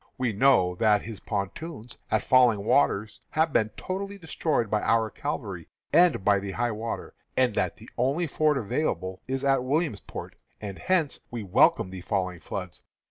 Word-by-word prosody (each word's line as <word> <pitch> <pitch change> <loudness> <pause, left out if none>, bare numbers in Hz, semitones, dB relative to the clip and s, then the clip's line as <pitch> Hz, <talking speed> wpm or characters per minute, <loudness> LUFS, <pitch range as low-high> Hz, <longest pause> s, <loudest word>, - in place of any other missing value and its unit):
We 125 -4 0
know 100 -6 +4
that 105 -1 +3
his 110 -3 -7
pontoons 115 - -5
at - - +1
Falling 120 -6 +4
Waters 110 -5 +2
have 160 -1 +1
been 110 - +3
totally 200 +2 -4
destroyed 160 - -1
by 105 0 0
our 115 -2 +2
cavalry - - -5 0.3
and 170 - +4
by 100 -1 +4
the 100 0 -5
high 120 +2 0
water, 110 +2 -5 0.2
and 125 -3 +3
that - - -1
the - - -13
only 140 +8 +1
ford 155 -1 +1
available 100 - -2
is 135 +1 -2
at 135 -2 +3
Williamsport, 145 - -3 0.2
and 100 -3 -7
hence 170 -7 +1
we 120 -2 -5
welcome 105 - +3
the 95 -1 -7
falling 90 -3 -2
floods. 90 0 -6
115 Hz, 165 wpm, -27 LUFS, 100-145 Hz, 0.3 s, know